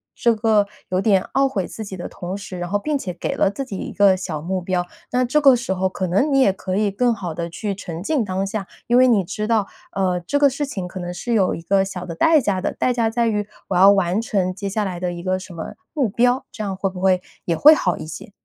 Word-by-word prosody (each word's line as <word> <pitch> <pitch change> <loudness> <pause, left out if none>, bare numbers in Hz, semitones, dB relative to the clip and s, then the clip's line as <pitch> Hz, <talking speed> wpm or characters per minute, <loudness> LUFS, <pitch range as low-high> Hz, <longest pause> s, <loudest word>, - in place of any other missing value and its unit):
这 235 - +3
个 215 -2 +2 0.2
有 185 0 +1
点 195 -3 +3
懊 270 +1 +3
悔 195 -8 -2
自 220 - -7
己 195 -3 -7
的 175 - -5
同 185 +2 -6
时， 190 -2 -8
然 175 - -4
后 205 +2 +1
并 300 +6 -1
且 185 -9 -5
给 170 - -3
了 195 - +3
自 275 +6 -5
己 200 -7 -6
一 - - -5
个 200 -2 +4
小 180 -4 -4
目 185 +3 -2
标， 180 0 -1 0.3
那 250 +1 +2
这 300 +5 +2
个 275 -2 +7
时 235 -5 -2
候 190 0 0
可 185 0 -3
能 200 - +1
你 270 - +4
也 230 -8 +4
可 185 0 -3
以 210 0 +2
更 240 +5 +1
好 185 -7 -5
的 170 +1 -4
去 200 +4 -4
沉 175 -4 -7
浸 260 - 0
当 190 0 -2
下， 195 -1 -4 0.2
因 240 - +3
为 255 - +7
你 225 -5 +4
知 210 +4 -3
道， 220 -4 +2 0.3
呃， 185 -2 0
这 285 +12 -1
个 285 -1 +6
事 285 +3 -3
情 190 -10 -5
可 185 - -10
能 175 0 -5
是 235 +7 -3
有 195 -5 +3
一 165 - -6
个 195 +3 +2
小 185 -2 -6
的 170 -2 -6
代 320 - +5
价 200 -7 -1
的， - - -1
代 250 - 0
价 230 -2 +1
在 235 +1 +1
于 210 -2 -1 0.2
我 - - -2
要 190 +3 +8
完 195 +1 +1
成 190 -5 -1
接 200 0 -4
下 210 +1 -1
来 180 -2 -4
的 175 0 -2
一 175 - -6
个 185 0 0
什 185 -1 -10
么 165 -1 -6 0.2
目 280 -6 +1
标， 245 +5 +1
这 215 - -5
样 195 -2 -2
会 195 0 0
不 185 -1 -8
会 185 -1 +3 0.2
也 170 - 0
会 305 +2 +9
好 180 - 0
一 - - -7
些？ 155 +5 -9
195 Hz, 300 characters per minute, -21 LUFS, 185-230 Hz, 0.3 s, 会